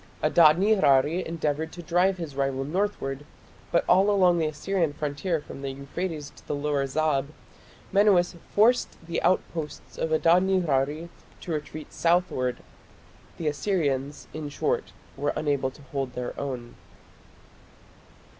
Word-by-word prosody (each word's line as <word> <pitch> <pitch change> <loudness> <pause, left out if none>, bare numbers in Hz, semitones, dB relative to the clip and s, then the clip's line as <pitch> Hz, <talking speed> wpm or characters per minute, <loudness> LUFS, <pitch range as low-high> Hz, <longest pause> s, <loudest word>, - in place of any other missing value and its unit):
Adad 155 0 +6
nirari 180 -5 +3
endeavoured 160 -1 -2
to 175 - -9
drive 180 +3 +2
his 160 -6 -6
rival 135 -1 0
northward, 145 -4 -2 0.5
but 170 - +2
all 195 +2 +5
along 180 -4 +4
the 160 - +1
Assyrian 160 +1 -1
frontier 150 +4 -2
from 140 -2 -10
the 135 - -3
Euphrates 145 +3 -5
to - - -19
the - - -1
Lower 145 -1 0
Zab, 140 -1 +1 0.7
Menuas 195 -3 +4
forced 235 +4 +3
the 170 - -2
outposts 165 -4 -2
of 160 - -1
Adad 165 +3 +4
nirari 165 -4 0 0.3
to 175 - -6
retreat 155 0 -5
southward. 165 -8 +1 0.7
The 165 - -3
Assyrians, 145 -4 -1
in 155 -2 -5
short, 455 - -1 0.2
were 145 +1 -1
unable 140 -3 0
to 140 +2 -16
hold 135 -3 -2
their 125 -1 -4
own. 125 -4 -5
155 Hz, 135 wpm, -26 LUFS, 140-180 Hz, 0.7 s, Adad